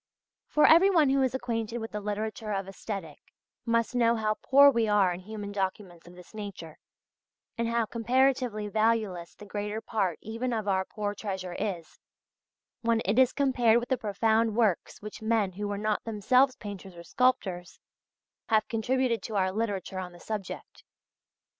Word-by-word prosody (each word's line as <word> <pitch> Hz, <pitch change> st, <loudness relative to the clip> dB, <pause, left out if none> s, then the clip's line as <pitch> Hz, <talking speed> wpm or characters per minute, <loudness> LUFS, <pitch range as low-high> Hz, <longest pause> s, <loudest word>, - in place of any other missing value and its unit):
For 300 Hz, -, +4 dB
everyone 335 Hz, -3 st, +6 dB
who 275 Hz, 0 st, +3 dB
is 260 Hz, -1 st, +1 dB
acquainted 235 Hz, -2 st, -3 dB
with 225 Hz, -1 st, -6 dB
the 210 Hz, -, -4 dB
literature 215 Hz, +1 st, -4 dB
of 195 Hz, -1 st, -2 dB
Aesthetic, 195 Hz, -5 st, -6 dB, 0.5 s
must 230 Hz, 0 st, +1 dB
know 235 Hz, -1 st, +3 dB
how 215 Hz, -1 st, 0 dB
poor 280 Hz, +1 st, +7 dB
we 230 Hz, -3 st, +1 dB
are 200 Hz, -4 st, +3 dB
in 175 Hz, -, -7 dB
human 205 Hz, +1 st, -7 dB
documents 190 Hz, -3 st, -4 dB
of 175 Hz, -, -13 dB
this 180 Hz, +3 st, -15 dB
nature, 200 Hz, -7 st, -8 dB, 0.8 s
and 235 Hz, -1 st, -1 dB
how 230 Hz, 0 st, +1 dB
comparatively 245 Hz, -1 st, +1 dB
valueless 215 Hz, -5 st, 0 dB
the 210 Hz, -, -12 dB
greater 210 Hz, +1 st, -4 dB
part 200 Hz, -7 st, -1 dB
even 230 Hz, +3 st, -3 dB
of 215 Hz, -2 st, -2 dB
our 190 Hz, -1 st, +1 dB
poor 205 Hz, 0 st, -4 dB
treasure 190 Hz, -3 st, -5 dB
is, 175 Hz, -5 st, -5 dB, 0.8 s
when 230 Hz, -1 st, +1 dB
it 210 Hz, +6 st, +2 dB
is 260 Hz, -1 st, +5 dB
compared 250 Hz, -5 st, +3 dB
with 240 Hz, -, -7 dB
the 260 Hz, -, +3 dB
profound 220 Hz, 0 st, +1 dB
works 215 Hz, -4 st, 0 dB
which 210 Hz, +1 st, -8 dB
men 220 Hz, -3 st, +1 dB
who 205 Hz, +3 st, -4 dB
were 205 Hz, 0 st, -3 dB
not 215 Hz, +1 st, -1 dB
themselves 250 Hz, +5 st, +2 dB
painters 195 Hz, -3 st, -9 dB
or 170 Hz, -, -10 dB
sculptors, 190 Hz, -8 st, 0 dB, 0.7 s
have 215 Hz, -2 st, +2 dB
contributed 240 Hz, +1 st, 0 dB
to 220 Hz, -, -6 dB
our 190 Hz, -1 st, +2 dB
literature 200 Hz, -3 st, -3 dB
on 180 Hz, -1 st, -6 dB
the 175 Hz, -, -14 dB
subject. 210 Hz, -2 st, -7 dB
215 Hz, 165 wpm, -28 LUFS, 195-235 Hz, 0.8 s, poor